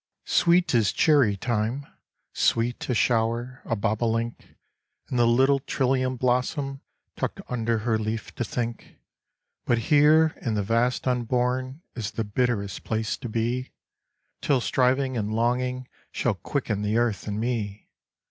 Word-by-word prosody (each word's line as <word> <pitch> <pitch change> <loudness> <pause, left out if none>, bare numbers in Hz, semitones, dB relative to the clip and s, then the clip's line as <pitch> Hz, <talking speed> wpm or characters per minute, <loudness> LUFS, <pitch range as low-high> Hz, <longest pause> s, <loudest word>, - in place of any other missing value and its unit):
Sweet 175 -1 +3
is 110 -5 +3
cherry 135 -10 +3
time, 120 +5 -1 0.5
sweet 120 +3 0
A 125 - +1
shower, 120 +2 0
a 115 - -1
bobolink, 115 +3 -2 0.5
And 125 - -1
the 120 - +5
little 135 +4 +4
trillium 130 -1 0
blossom 135 +3 0 0.3
Tucked - - -3
under 115 -2 0
her 110 -2 +2
leaf 110 0 -4
to - - -2
think; 115 0 -4 0.7
But 120 - +2 0.2
here 155 +2 +5
in 115 -4 -1
the 105 - 0
vast 115 +5 +1
unborn 125 +3 -1
Is 110 -4 -4
the 115 - -1
bitterest 105 -2 -1
place 110 -1 -1
to 125 - -6
be, 120 +3 -2 0.7
Till 140 -3 +2
striving 130 +1 +1
and 110 0 -2
longing 125 +2 0 0.2
Shall 120 - 0
quicken 105 - -3
the 105 +2 0
earth 120 -4 0
and 105 0 -2
me. 110 -4 -3
120 Hz, 140 wpm, -26 LUFS, 110-130 Hz, 0.7 s, the